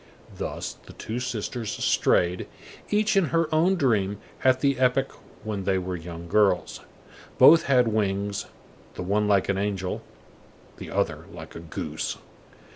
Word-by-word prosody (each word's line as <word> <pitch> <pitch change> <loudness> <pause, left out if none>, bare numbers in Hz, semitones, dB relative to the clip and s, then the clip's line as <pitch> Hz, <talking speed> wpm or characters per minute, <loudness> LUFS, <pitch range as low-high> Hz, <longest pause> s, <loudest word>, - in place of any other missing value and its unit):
Thus - - -5
the - - -11
two 115 +3 -5
sisters 120 -2 -3
strayed, 90 +1 +1 0.4
each 210 0 +2
in 195 -3 +4
her 165 +2 +1
own 170 +5 +4
dream, 105 - +1 0.3
at 130 0 +4
the 140 -2 +2
epoch 130 +1 +2 0.3
when 105 -2 -3
they 95 0 +1
were 90 0 -3
young 85 0 -8
girls. 100 -1 +2 0.6
Both 165 +2 +8
had 125 -3 +4
wings, 100 -2 -1 0.5
the - - -5
one 105 +3 +1
like 100 -2 +3
an 100 -1 0
angel, 100 -2 -2 0.8
the - - -8
other - - -1
like - - -10
a - - -8
goose. 85 -2 -4
105 Hz, 145 wpm, -26 LUFS, 95-130 Hz, 0.8 s, Both